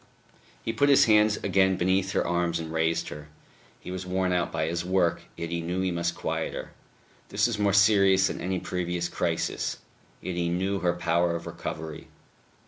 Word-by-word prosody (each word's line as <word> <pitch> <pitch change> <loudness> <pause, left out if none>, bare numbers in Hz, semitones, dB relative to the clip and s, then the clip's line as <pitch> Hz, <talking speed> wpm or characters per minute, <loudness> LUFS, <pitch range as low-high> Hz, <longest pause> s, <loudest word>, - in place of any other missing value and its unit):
He 115 - -1
put 140 +5 +3
his 140 - +6
hands 105 -1 +4
again 95 -1 +3
beneath 95 +1 +1
her - - +1
arms 85 -1 0
and 80 -1 -6
raised 80 0 0
her. 75 0 -9 0.5
He - - -8
was 95 0 -4
worn 90 0 0
out 90 -1 0
by 80 - -1
his 85 +1 -2
work, 90 -2 +1
yet 85 0 -5
he 85 0 -1
knew 90 +3 -2
he 95 -1 0
must 85 0 -1
quiet - - -3
her. - - -6 0.6
This 105 +1 +1
was 120 -3 -1
more 100 -1 +3
serious 100 -2 +5
than - - -2
any 95 0 -1
previous 90 -1 -2
crisis. 85 -2 -2 0.4
Yet 90 - -5
he 85 -1 0
knew 95 +3 -1
her 90 -2 +1
power 85 0 +1
of 85 - -5
recovery. 80 -1 -6
90 Hz, 190 wpm, -27 LUFS, 85-95 Hz, 0.6 s, his